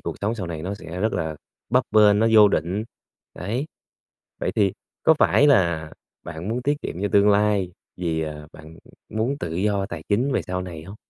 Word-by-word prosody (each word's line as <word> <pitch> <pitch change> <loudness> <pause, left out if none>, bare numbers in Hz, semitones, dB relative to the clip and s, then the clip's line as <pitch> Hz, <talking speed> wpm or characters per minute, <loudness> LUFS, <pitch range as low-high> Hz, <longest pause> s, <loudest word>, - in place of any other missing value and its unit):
cuộc - - -5
sống 105 +3 -1
sau 100 -6 -5
này 80 -2 -5
nó 95 +3 -3
sẽ 90 -2 -8
rất 110 +2 +1
là 80 -4 -2 0.3
bấp 125 +2 +3
bênh, 105 -1 +5
nó 110 - +3
vô 105 -2 +8
định, 95 +3 -1 0.5
đấy. 115 +10 -3 0.7
Vậy - - -1
thì 100 -3 +3 0.3
có 160 - +5
phải 145 - +4
là 85 - +2 0.3
bạn 80 +5 -6
muốn 120 +2 -2
tiết 145 +2 -1
kiệm 90 - -5
cho 100 - +1
tương 100 0 +5
lai 100 -3 +2 0.2
vì, 85 -3 -2
ờ, 75 -1 -6
bạn 80 +1 -13 0.3
muốn 115 +6 -2
tự 80 -7 -4
do 100 +1 0
tài 85 -5 -7
chính 120 +7 +1
về - - 0
sau 90 0 -3
này 85 -4 -8
hông? 95 +4 -10
100 Hz, 205 wpm, -23 LUFS, 85-110 Hz, 0.7 s, vô